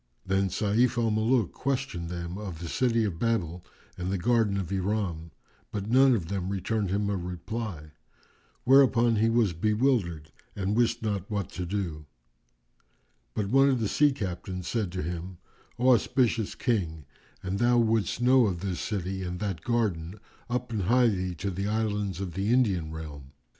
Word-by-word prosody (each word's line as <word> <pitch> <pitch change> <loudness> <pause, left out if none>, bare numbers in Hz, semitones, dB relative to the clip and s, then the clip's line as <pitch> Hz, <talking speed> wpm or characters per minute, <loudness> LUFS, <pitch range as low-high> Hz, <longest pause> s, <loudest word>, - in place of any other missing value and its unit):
Then 95 0 +1
Sayf 115 +6 +1
al 115 -2 +2
Muluk 110 -2 +2
questioned 130 -11 -3
them 85 0 -5
of 100 -5 -6
the 85 +1 -6
City 115 +4 +1
of 95 -6 -2
Babel 90 -7 -1 0.4
and 90 +1 -2
the 100 - 0
Garden 110 0 +2
of 95 -3 -3
Iram, 95 -4 -2 0.4
but 105 +1 -4
none 130 0 +6
of 90 -7 -3
them 95 -1 -3
returned 100 +1 -1
him 100 +2 0
a 100 - 0
reply, 90 -2 -5 0.7
whereupon 120 -3 +5
he 110 +2 +3
was 115 -5 +2
bewildered 105 - 0 0.2
and 100 +1 -1
wist 115 -1 +1
not 100 -2 -2
what 100 -4 -3
to 90 -1 -4
do; 85 -6 -3 1.3
but 100 -2 -1
one 135 +3 +5
of 130 -3 +2
the 110 - 0
sea 145 +7 +4
captains 90 -6 -5
said 110 -7 -1
to 90 - -3
him, 85 +2 -5 0.4
"O 125 +2 +3
auspicious 115 -2 +1
King, 85 - -1 0.4
an 95 +1 -2
thou 120 +2 +3
wouldst 115 -2 +1
know 125 -2 +5
of 90 -3 -3
this 95 -3 -3
city 95 -2 -3
and 90 -1 -4
that 95 -6 -3
garden, 100 -5 -1 0.3
up 125 0 -2
and 110 -3 -1
hie 120 +3 +4
thee 90 -3 -2
to 100 +5 -3
the 100 +3 -3
Islands 105 -3 -1
of 95 -3 -4
the 100 +5 -1
Indian 100 -11 +2
realm." 75 -3 -8
100 Hz, 170 wpm, -28 LUFS, 90-115 Hz, 1.3 s, none